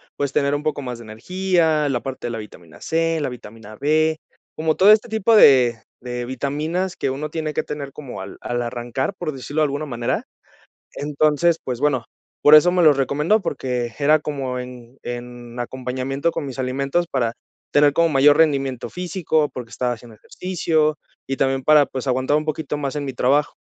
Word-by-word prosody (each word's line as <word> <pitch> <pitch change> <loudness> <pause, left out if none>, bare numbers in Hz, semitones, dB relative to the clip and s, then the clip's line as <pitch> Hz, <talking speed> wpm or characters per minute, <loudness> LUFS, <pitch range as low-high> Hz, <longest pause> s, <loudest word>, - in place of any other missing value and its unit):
pues 140 -1 -2
tener 140 0 +1
un 145 - -4
poco 155 -2 -1
más 125 -2 -6
de - - -10
energía, 160 - 0
la 120 -3 -1
parte 130 -2 -5
de - - -4
la 115 - -4
vitamina 90 -7 -12
C, 165 0 0
la 145 - -1
vitamina 110 -3 -10
B, 155 +4 +1 0.3
como 155 0 0
todo 200 +3 +7
este 220 +2 +1
tipo 220 +1 +2
de 125 - +7 0.2
de 125 0 -5
vitaminas 155 +8 -2
que 135 - -1
uno 145 +3 -4
tiene 155 -2 -3
que - - -1
tener 140 -2 -6
como 135 -4 -8
al - - -9
al 120 0 -3
arrancar, 120 +7 -3
por 175 -6 -4
decirlo 145 +4 -3
de - - +4
alguna 145 +2 -3
manera, 120 0 -2 0.7
entonces, 150 +3 +1
pues 125 -2 -4
bueno, 140 -5 +1 0.4
por 150 +1 +8
eso 175 +4 +6
me 180 -2 +3
los 150 -3 +6
recomendó, 150 - +1
porque 125 -7 -3
era 150 +2 +4
como 135 -4 -4
en 125 0 -10
en 120 0 -7
acompañamiento 130 +5 -2
con 145 - -4
mis 135 -1 -7
alimentos 140 +6 0
para 120 -4 0 0.4
tener 145 -1 +4
como 165 0 +3
mayor 145 +1 +5
rendimiento 135 -5 +1
físico 170 -4 -1
porque 120 -2 -7
estaba 125 0 -1
haciendo 115 -1 -13
ejercicio, 160 - -1 0.3
y 135 - -2
también 135 -1 0
para, 150 -2 +6
pues, 130 +1 -6
aguantar 130 +3 +1
un 155 - -2
poquito 155 -1 -3
más 140 0 -3
en 145 - -3
mi 135 - -4
trabajo. 145 +4 +2
140 Hz, 190 wpm, -21 LUFS, 125-155 Hz, 0.7 s, por